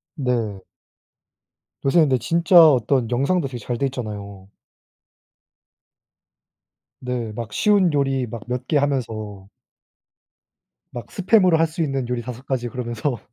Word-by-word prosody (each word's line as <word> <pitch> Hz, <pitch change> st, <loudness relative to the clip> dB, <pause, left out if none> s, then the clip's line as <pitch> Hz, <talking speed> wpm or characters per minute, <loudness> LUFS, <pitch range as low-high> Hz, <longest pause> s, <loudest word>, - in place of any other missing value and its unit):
네. 115 Hz, -, -2 dB, 1.2 s
요새 150 Hz, +5 st, +4 dB
근데 140 Hz, -5 st, +4 dB
진짜 170 Hz, -, +2 dB
어떤 125 Hz, -2 st, +1 dB
영상도 140 Hz, +6 st, +1 dB
되게 125 Hz, -2 st, -7 dB
잘 120 Hz, +2 st, -4 dB
돼 140 Hz, -, 0 dB
있잖아요. 100 Hz, -6 st, -7 dB, 2.5 s
네. 125 Hz, -3 st, -4 dB
막 110 Hz, 0 st, -7 dB
쉬운 200 Hz, -6 st, +3 dB
요리 135 Hz, -2 st, 0 dB
막 115 Hz, -1 st, -8 dB
몇 125 Hz, 0 st, -3 dB
개 155 Hz, -, +2 dB
하면서 110 Hz, -8 st, -3 dB, 1.4 s
막 120 Hz, -4 st, -8 dB
스팸으로 190 Hz, -2 st, +3 dB
할 165 Hz, +1 st, +3 dB
수 160 Hz, +2 st, -5 dB
있는 135 Hz, -5 st, -1 dB
요리 125 Hz, -1 st, -2 dB
5 125 Hz, +2 st, -8 dB
가지 125 Hz, -3 st, -2 dB
그러면서. 120 Hz, +1 st, -3 dB
125 Hz, 220 characters per minute, -22 LUFS, 115-145 Hz, 2.5 s, 요새